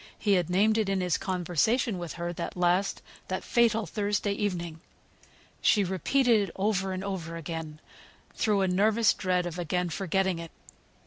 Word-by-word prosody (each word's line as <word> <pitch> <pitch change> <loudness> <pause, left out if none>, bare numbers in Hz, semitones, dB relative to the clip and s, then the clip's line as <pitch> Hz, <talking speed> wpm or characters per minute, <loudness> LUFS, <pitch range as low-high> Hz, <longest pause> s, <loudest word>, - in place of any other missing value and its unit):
He 205 - +1
had 180 -3 +2
named 215 +5 +3
it 210 -3 0
in 195 -1 +1
his 180 -3 +1
conversation 185 - 0
with 175 -3 -5
her 175 0 -4
that 175 - -5
last, 180 +2 +1 0.2
that 185 - -3
fatal 230 -2 +2
Thursday 205 +3 -1
evening. 175 -6 -3 0.8
She 205 - +4
repeated 205 - +2
it - - -13
over 195 -1 0
and 185 0 -4
over 180 -4 -4
again, 160 -1 -6 0.5
through 210 -4 +1
a 190 - +2
nervous 210 +4 +3
dread 180 -2 0
of 175 0 -5
again 180 +1 -1
forgetting 190 0 0
it. 165 0 -7
190 Hz, 165 wpm, -28 LUFS, 175-205 Hz, 0.8 s, She